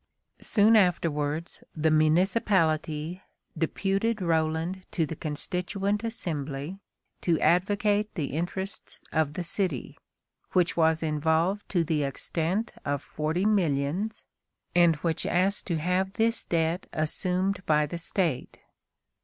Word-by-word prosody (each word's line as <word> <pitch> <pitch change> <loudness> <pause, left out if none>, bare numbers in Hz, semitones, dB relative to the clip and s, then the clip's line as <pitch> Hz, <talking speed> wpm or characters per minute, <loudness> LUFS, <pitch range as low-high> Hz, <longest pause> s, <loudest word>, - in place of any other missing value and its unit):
Soon 215 +1 +4
afterwards, 165 -5 +1
the 160 0 +2
municipality 160 0 +2 0.3
deputed 195 +6 0
Roland 165 +1 0
to 165 - 0
the 160 - -6
Constituent 190 +7 -2
Assembly 160 - -3 0.4
to 165 -3 +1
advocate 205 +3 +2
the 145 -7 -3
interests 180 +5 -4
of 155 -2 +1
the 180 - -2
city, 170 - -2 0.5
which 180 -2 +2
was 160 -1 +3
involved 160 +6 0
to 175 -4 +2
the 160 -2 0
extent 165 - -1
of 145 0 -2
forty 160 +5 -2
millions, 185 +1 0 0.5
and 170 -2 +5
which 165 -2 0
asked 190 +3 +1
to 170 -4 0
have 180 +4 0
this 225 +2 +1
debt 165 +1 0
assumed 185 +5 -1
by 150 -1 +4
the 170 +4 -5
State. 165 -6 0
170 Hz, 115 wpm, -27 LUFS, 155-195 Hz, 0.5 s, and